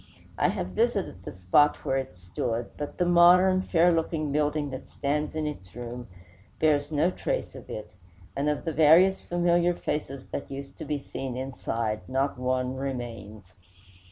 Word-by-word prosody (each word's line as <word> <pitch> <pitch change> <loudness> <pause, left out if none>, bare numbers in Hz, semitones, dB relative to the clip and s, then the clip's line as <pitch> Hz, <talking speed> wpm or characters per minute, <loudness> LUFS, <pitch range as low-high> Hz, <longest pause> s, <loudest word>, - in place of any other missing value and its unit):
I - - +2
have 90 - -3
visited 90 - 0
the - - -6
spot 95 +12 +2
where 135 - +1
it 130 -9 -5
stood, 115 +6 -3
but 145 -1 -6
the 180 - +2
modern, 180 +2 +6
fair 175 -1 +3
looking 160 -2 -1
building 150 0 0
that 130 - -8
stands 150 +2 -2
in 155 -1 -1
its 95 -12 -7
room 120 0 -7 0.5
bears 150 -1 +2
no 155 +4 +2
trace - - -3
of - - -11
it; 105 -1 -7 0.4
and 145 +2 0
of 150 - -2
the 165 - -1
various 165 +6 +6
familiar 175 0 +2
faces 135 -5 -4
that - - -5
used 140 0 -7
to - - -5
be 150 0 -1
seen 135 -2 -6
inside 115 -4 -3
not 135 0 0
one 130 0 -1
remains. 115 -7 -6
140 Hz, 165 wpm, -27 LUFS, 120-155 Hz, 0.5 s, modern